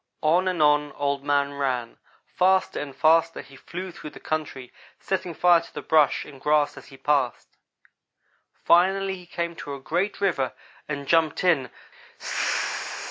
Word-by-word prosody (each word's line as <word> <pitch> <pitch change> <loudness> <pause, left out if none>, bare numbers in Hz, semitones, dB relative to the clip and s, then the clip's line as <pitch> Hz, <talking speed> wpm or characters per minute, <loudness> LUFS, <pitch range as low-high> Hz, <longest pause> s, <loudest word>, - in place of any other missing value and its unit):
On 175 +4 +3
and 180 -4 +1
on 150 -1 +3
Old 140 -1 -2
man 145 0 +1
ran. 130 -4 -3 0.3
Faster 185 +1 +1
and 140 -2 -6
faster 165 +1 +3
he 135 - -16
flew 180 +7 -7
through 170 -3 -9
the - - -13
country, 150 -5 -4 0.3
setting 185 -3 -3
fire 175 0 +5
to - - -14
the - - -7
brush 155 -2 +3
and 140 -3 -13
grass 150 -1 +2
as - - -12
he 135 - -14
passed. 135 -2 0 1.0
Finally 190 +2 +2
he 180 -1 -13
came 170 0 -4
to 140 -1 -6
a - - -9
great 175 +9 -2
river, 170 -11 0 0.4
and 145 -2 -4
jumped 165 0 +2
in. 150 -9 +2
155 Hz, 155 wpm, -25 LUFS, 140-175 Hz, 1.0 s, fire